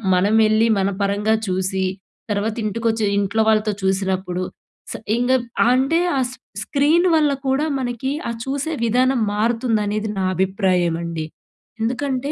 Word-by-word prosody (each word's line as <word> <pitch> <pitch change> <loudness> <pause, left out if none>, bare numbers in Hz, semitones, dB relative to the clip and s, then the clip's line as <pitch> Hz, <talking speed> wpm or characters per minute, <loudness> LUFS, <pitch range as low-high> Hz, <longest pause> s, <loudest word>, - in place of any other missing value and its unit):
మనం 200 +4 +2
వెళ్లి, 215 +1 +3
మన 195 0 +1
పరంగా 205 +2 +1
చూసి, 190 +1 -1 0.5
తర్వాత 210 +2 -1
ఇంటికోచ్చి, 220 +1 0
ఇంట్లో 205 +3 +1
వాళ్ళతో 215 -1 +2
చూసినప్పుడు 190 -1 -1 0.5
స - - -7 0.2
ఇంగప్ 245 0 +1 0.2
అంటే, 270 +6 +2 0.2
ఆ - - +2
స్ - - -10 0.3
స్క్రీన్ 305 +9 +2
వల్ల 300 -2 +3 0.2
కూడా 270 +3 +1
మనకి, 250 +1 -2 0.2
ఆ - - -1
చూసే 280 +4 -2
విధానం 250 +2 +2
మారుతుందనేది, 215 -1 0
నా - - 0
అభిప్రాయమండి. 175 -4 0 0.6
ఎందుకంటే 260 +3 -1
220 Hz, 125 wpm, -21 LUFS, 195-255 Hz, 0.6 s, వెళ్లి